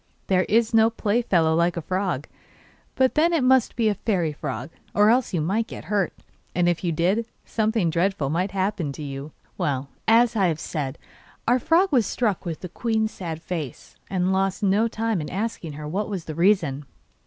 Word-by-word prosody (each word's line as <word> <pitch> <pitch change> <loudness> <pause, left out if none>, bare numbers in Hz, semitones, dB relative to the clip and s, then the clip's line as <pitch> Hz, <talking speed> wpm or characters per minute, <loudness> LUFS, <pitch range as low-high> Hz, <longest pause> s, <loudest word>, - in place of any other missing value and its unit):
There 185 -1 +2
is 230 +1 +3
no 225 0 +6
play 225 0 0
fellow 165 -8 +2
like 170 +1 +2
a - - -1
frog; 185 -6 -1 0.7
but 260 -1 +3
then 330 +3 +3
it 320 -6 +2
must 255 -2 +4
be 230 -2 +2
a 210 - +3
fairy 180 -7 -1
frog, 130 0 -5 0.2
or 210 +1 +6
else 250 +1 +2
you 175 -5 0
might 205 +8 0
hurt 200 -3 -1
it, - - -25 0.3
and 175 0 +2
if 175 0 0
you 175 - +1
did 185 +8 +1 0.2
something 220 -6 +1
dreadful 170 -4 0
might 180 +5 0
happen 190 -5 -1
to 150 - -7
you. 140 +1 -6 0.3
Well, 140 -6 -1 0.2
as 230 +1 +5
I 195 -4 +3
have 160 -2 -1
said, 145 -4 -4 0.5
our 245 +2 +4
frog 345 +9 +3
was 240 -8 +3
struck 215 -8 -1
with 165 -3 -4
the 180 - -6
queen's 220 +3 -1
sad 165 -3 -6
face, 160 -8 -6
and 185 0 +1
lost 195 +2 0
no 205 +3 +3
time 225 -4 -1
in 150 - -5
asking 195 -5 -3
her 150 +1 -7
what 200 +7 -2
was 190 -5 -4
the 155 - -5
reason. 165 -5 +2
190 Hz, 200 wpm, -24 LUFS, 165-220 Hz, 0.7 s, no